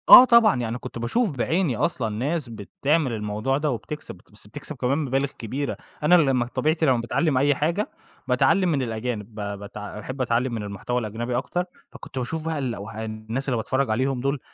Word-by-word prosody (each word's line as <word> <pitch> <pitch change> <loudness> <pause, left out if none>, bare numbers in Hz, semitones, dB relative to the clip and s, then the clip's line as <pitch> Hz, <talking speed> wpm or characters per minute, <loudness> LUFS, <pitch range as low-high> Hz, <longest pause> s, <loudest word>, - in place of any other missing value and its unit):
آه 255 - +13
طبعًا، 235 -4 +6
يعني 115 0 -2
كنت 120 - -7
باشوف 200 - +1
بعيني 145 - 0
أصلًا 125 -7 0
ناس 130 +6 -2
بتعمل 135 +6 0
الموضوع 110 +5 -1
ده 150 0 0
وبتكسب 150 +3 -6
بت 90 - -22
بس 105 0 -15
بتكسب 130 +8 -7
كمان 130 +2 0
مبالغ 135 -2 0
كبيرة، 135 +5 -3 0.3
أنا 175 +4 +6
لمّا 135 -7 +3
طبيعتي 155 +6 +1
لمّا 130 -4 +4
باتعلّم 140 +4 +1
أي 145 +2 +4
حاجة، 170 - 0 0.4
باتعلّم 185 -2 +3
من 145 -5 +1
الأجانب 110 -2 -4
ب 105 - -5 0.2
بتع 105 0 -7
باحب 130 +5 -5
أتعلّم 120 +1 +1
من 110 -2 -3
المحتوى 105 +5 -2
الأجنبي 120 +2 -3
أكتر، 180 0 -1 0.3
فكنت - - -10
باشوف 155 +6 -3
بقى 160 -2 -1
الأوه 110 -4 -4
الناس 110 +5 -4
اللي 125 - +1
باتفرّج 130 +4 0
عليهم 130 +3 0
دُول، 140 +2 0
130 Hz, 185 wpm, -24 LUFS, 115-150 Hz, 0.4 s, آه